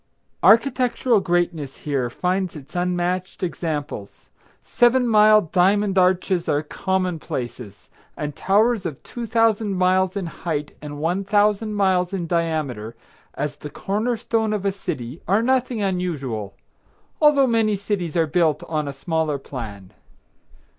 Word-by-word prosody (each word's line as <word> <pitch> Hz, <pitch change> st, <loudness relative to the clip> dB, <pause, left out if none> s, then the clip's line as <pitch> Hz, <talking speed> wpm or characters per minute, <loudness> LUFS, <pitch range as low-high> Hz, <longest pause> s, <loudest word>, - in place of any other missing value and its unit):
Architectural 250 Hz, -1 st, +4 dB
greatness 175 Hz, -6 st, -1 dB
here 135 Hz, -5 st, -2 dB
finds 180 Hz, +6 st, -1 dB
its 150 Hz, +1 st, -12 dB
unmatched 180 Hz, +1 st, -1 dB
examples. 150 Hz, -, -4 dB, 0.3 s
Seven 245 Hz, +1 st, +3 dB
mile 215 Hz, -1 st, +6 dB
diamond 195 Hz, +3 st, +2 dB
arches 185 Hz, -1 st, +2 dB
are 145 Hz, +1 st, +1 dB
common 185 Hz, +1 st, -2 dB
places, 120 Hz, -7 st, -6 dB, 0.3 s
and 150 Hz, -1 st, -4 dB
towers 215 Hz, +2 st, +2 dB
of 150 Hz, -5 st, -8 dB
two 240 Hz, -1 st, -6 dB
thousand 225 Hz, -2 st, +2 dB
miles 185 Hz, +1 st, +2 dB
in 195 Hz, -, -2 dB
height 155 Hz, -3 st, -4 dB
and 145 Hz, -1 st, -7 dB
one 175 Hz, +6 st, -1 dB
thousand 210 Hz, +1 st, +2 dB
miles 190 Hz, -2 st, +2 dB
in 180 Hz, -3 st, -2 dB
diameter, 155 Hz, -10 st, -2 dB, 0.4 s
as 145 Hz, 0 st, -3 dB
the 150 Hz, -, -8 dB
corner 215 Hz, +9 st, -2 dB
stone 220 Hz, -1 st, 0 dB
of 205 Hz, -2 st, -3 dB
a 200 Hz, -, +2 dB
city, 135 Hz, -7 st, -6 dB
are 200 Hz, +5 st, +3 dB
nothing 255 Hz, -3 st, +1 dB
unusual, 140 Hz, -, -3 dB, 0.7 s
although 295 Hz, -3 st, +6 dB
many 225 Hz, -4 st, +2 dB
cities 190 Hz, -4 st, -3 dB
are 165 Hz, -, +3 dB
built 155 Hz, -1 st, +1 dB
on 155 Hz, -2 st, -2 dB
a 140 Hz, -, -4 dB
smaller 160 Hz, +1 st, -1 dB
plan. 105 Hz, -9 st, -8 dB
180 Hz, 135 wpm, -22 LUFS, 150-210 Hz, 0.7 s, mile